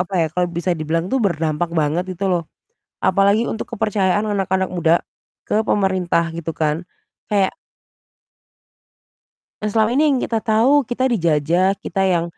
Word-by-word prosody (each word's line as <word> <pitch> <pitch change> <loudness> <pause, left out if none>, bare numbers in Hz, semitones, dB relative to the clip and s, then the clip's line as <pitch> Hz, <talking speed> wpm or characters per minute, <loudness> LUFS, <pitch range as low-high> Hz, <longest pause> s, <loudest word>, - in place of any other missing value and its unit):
apa 180 +2 -3
ya, 160 - +2
kalau 180 0 +1
bisa 175 +1 -1
dibilang 160 +2 -1
tuh 265 - +3
berdampak 165 -1 -1
banget 155 +4 0
itu 190 +3 -5
loh. 175 -1 +1 0.6
Apalagi 200 +2 +3
untuk 220 - -5
kepercayaan 205 -1 +1
anak-anak 190 -1 0
muda 165 -1 +3 0.5
ke - - 0
pemerintah 185 -4 +1
gitu 165 -1 -4
kan. 150 -1 +2 0.5
Kayak 200 -2 +2 2.1
yang 210 - -1
selama 220 0 +3
ini 290 - +3
yang - - +1
kita 225 - 0
tahu 235 +5 +3
kita 250 +1 -1
dijajah, 170 -1 +2
kita 195 - -1
yang 170 -2 +2
190 Hz, 145 wpm, -20 LUFS, 170-210 Hz, 2.1 s, tuh